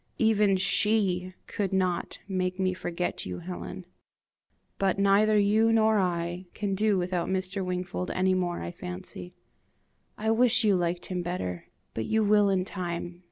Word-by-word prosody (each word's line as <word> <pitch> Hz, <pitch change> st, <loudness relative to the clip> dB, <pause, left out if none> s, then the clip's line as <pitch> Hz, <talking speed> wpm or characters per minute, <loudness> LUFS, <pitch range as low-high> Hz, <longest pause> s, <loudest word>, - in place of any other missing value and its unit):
Even 210 Hz, -3 st, +3 dB
SHE 185 Hz, -2 st, +1 dB
could 200 Hz, -2 st, -3 dB
not 185 Hz, -2 st, -1 dB
make 185 Hz, -1 st, -2 dB
me 185 Hz, -1 st, +1 dB
forget 175 Hz, -1 st, -3 dB
you, 90 Hz, -1 st, -5 dB
Helen. 180 Hz, +1 st, -7 dB, 0.9 s
But 195 Hz, -1 st, +1 dB
neither 200 Hz, +2 st, +4 dB
you 215 Hz, +2 st, +4 dB
nor 220 Hz, -1 st, +4 dB
I 175 Hz, 0 st, -2 dB
can 205 Hz, -2 st, -2 dB
do 210 Hz, 0 st, +2 dB
without 180 Hz, -1 st, -1 dB
Mr. 190 Hz, +1 st, -1 dB
Wingfold 180 Hz, 0 st, -3 dB
any 185 Hz, 0 st, +1 dB
more, 180 Hz, -2 st, -1 dB
I 85 Hz, -, -4 dB
fancy. 90 Hz, 0 st, -8 dB, 0.8 s
I 220 Hz, +1 st, 0 dB
wish 240 Hz, +1 st, +4 dB
you 205 Hz, -3 st, +4 dB
liked 175 Hz, 0 st, -1 dB
him 180 Hz, -1 st, -3 dB
better! 165 Hz, -, -4 dB, 0.3 s
but 110 Hz, -, -3 dB
you 220 Hz, 0 st, +1 dB
will 205 Hz, -1 st, +4 dB
in 185 Hz, -2 st, +1 dB
time. 175 Hz, -2 st, -5 dB
185 Hz, 155 wpm, -28 LUFS, 175-205 Hz, 0.9 s, neither